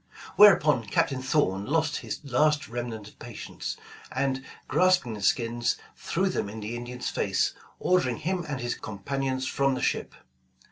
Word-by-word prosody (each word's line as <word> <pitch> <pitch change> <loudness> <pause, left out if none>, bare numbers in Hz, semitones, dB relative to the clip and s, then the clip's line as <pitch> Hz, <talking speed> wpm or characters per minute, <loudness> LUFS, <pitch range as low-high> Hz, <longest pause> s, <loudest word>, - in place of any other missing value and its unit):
Whereupon 150 - +6
Captain 130 +5 +1
Thorn 105 -8 +1
lost 155 0 +1
his - - -5
last 150 +2 +2
remnant 115 -3 -5
of - - -23
patience, 120 -2 -6 0.3
and 135 -1 -1 0.2
grasping 180 -10 +3
the 105 - -7
skins, 120 +3 +1 0.2
threw 190 +3 -1
them 180 - -1
in 110 +2 -7
the 110 +3 -4
Indian 120 +1 -7
's - - -1
face, - - +1 0.3
ordering 135 -10 +2
him 180 +2 -1
and 140 -3 -2
his 120 0 -1
companions 130 +5 -3
from 135 0 +1
the - - -4
ship. - - -1
130 Hz, 155 wpm, -27 LUFS, 120-150 Hz, 0.3 s, Whereupon